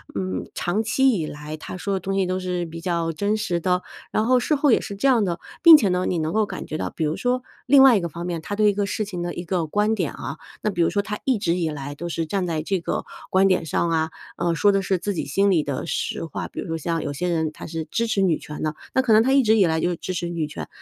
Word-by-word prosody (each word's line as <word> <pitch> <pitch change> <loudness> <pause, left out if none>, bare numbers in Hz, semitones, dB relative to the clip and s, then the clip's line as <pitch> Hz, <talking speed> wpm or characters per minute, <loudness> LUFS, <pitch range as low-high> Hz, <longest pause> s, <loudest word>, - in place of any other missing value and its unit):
嗯， 95 -2 -3
长 175 +5 0
期 265 +4 +3
以 170 -9 -1
来 150 +1 -7
他 155 - -7
说 200 +2 -2
的 190 - 0
东 195 +2 -3
西 195 -1 +2
都 185 +1 -1
是 180 -1 -2
比 165 0 -8
较 170 -2 -1
真 205 +6 0
实 175 -5 -1
的， 180 +1 0 0.3
然 215 - +1
后 255 +1 +4
事 300 +5 +1
后 285 -1 +3
也 - - +4
是 200 - -6
这 205 +8 +1
样 245 -5 +4
的， 175 -3 -2 0.2
并 330 -2 +10
且 210 -9 +1
呢， 180 0 0
你 180 - 0
能 160 0 -1
够 220 - +3
感 - - -6
觉 155 - -6
到 - - -2
比 - - -4
如 155 +1 -1
说 250 0 0 0.2
另 270 +1 +7
外 265 -3 +8
一 200 - +2
个 170 - -3
方 170 +2 -6
面， 170 -2 -3
它 205 - -4
对 210 0 +4
一 - - -5
个 200 0 -1
事 215 +1 -2
情 185 -4 -5
的 175 0 -3
一 175 - -5
个 170 -2 -1
观 210 +6 +1
点 180 -9 -1
啊 140 +3 -6 0.3
那 215 - +1
比 175 - -1
如 165 - +4
说 200 - 0
它 210 0 -4
一 260 -4 +2
直 185 -5 0
以 170 -3 0
来 145 -1 -5
都 170 +4 -6
是 165 0 -2
站 185 +3 -1
在 160 -2 -2
这 190 +3 0
个 - - -3 0.2
观 190 +1 +4
点 185 -3 +2
上 170 - 0
啊， 160 -1 +1 0.3
呃， 170 -1 0
说 205 +5 +4
的 195 0 +1
是 190 0 0
自 205 +3 -2
己 175 - -3
心 195 +8 +2
里 170 -4 +3
的 140 -2 -3
实 165 +1 -2
话。 160 - -5
比 - - -9
如 - - -4
说 165 - -2
像 165 +1 -2
有 - - -3
些 180 +6 -2
人 160 -2 0
他 - - -9
是 160 -1 -4
支 230 +7 -1
持 205 -3 +1
女 175 -4 +2
权 150 - -7
的， 155 -1 -1 0.2
那 260 - +5
可 235 -4 +3
能 215 - +7
他 260 +4 +2
一 275 0 +5
直 220 -1 +4
以 200 - +5
来 160 0 +1
就 175 +1 0
支 185 - -5
持 175 0 -2
女 170 -3 -2
权， 150 - -7
180 Hz, 325 characters per minute, -23 LUFS, 165-210 Hz, 0.3 s, 并